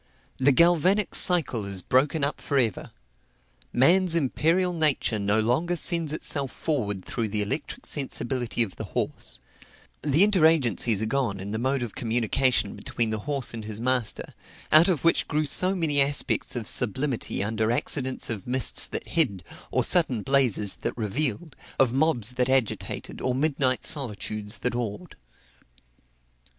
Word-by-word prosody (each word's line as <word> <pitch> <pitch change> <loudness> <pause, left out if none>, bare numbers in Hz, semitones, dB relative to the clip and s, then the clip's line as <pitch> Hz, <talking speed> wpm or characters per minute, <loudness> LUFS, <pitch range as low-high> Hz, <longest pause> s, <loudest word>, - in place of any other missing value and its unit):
The 130 +3 +3
galvanic 175 +7 +3
cycle 160 - +3
is 100 -2 -4
broken 140 - +1
up 140 - -2
for 140 - -2
ever: 115 -7 -1 0.8
man's 170 +7 +4
imperial 170 +5 +1
nature 150 -9 0
no 100 +2 +1
longer 130 +11 0
sends 170 -2 0
itself 140 -3 -1
forward 105 - -3
through 115 -2 -3
the 105 0 -1
electric 105 +10 -4
sensibility 125 -4 -1
of 95 -7 -8
the - - -5
horse; - - -2 0.6
the 150 +5 +3
inter 195 -6 +4
agencies 120 - +1
are - - +1
gone 115 -4 -2
in 100 +2 -6
the 110 - -3
mode 130 +1 -1
of 115 - -6
communication 120 -1 +1
between 115 -2 -1
the 110 - -2
horse 140 -5 +1
and 110 -2 -6
his 105 0 -5
master, 125 -2 -1 0.4
out 155 +4 +7
of 175 -7 0
which 165 - +2
grew 155 0 -1
so 185 +6 +1
many 155 -5 +1
aspects 140 -1 0
of 115 -3 -4
sublimity 125 -2 -1
under 110 +2 -1
accidents 130 +1 -1
of 110 -3 -6
mists 125 -3 +3
that - - -5
hid, 100 - 0 0.3
or - - +1
sudden 135 - +2
blazes 125 -7 +2
that - - -5
revealed, 130 - -2 0.2
of 130 -3 +2
mobs 135 -6 +1
that 125 0 -1
agitated, 130 -4 -2
or 125 - -1
midnight 135 -2 0
solitudes 105 -6 -2
that 125 - -2
awed. 120 - -5
130 Hz, 155 wpm, -25 LUFS, 110-155 Hz, 0.8 s, out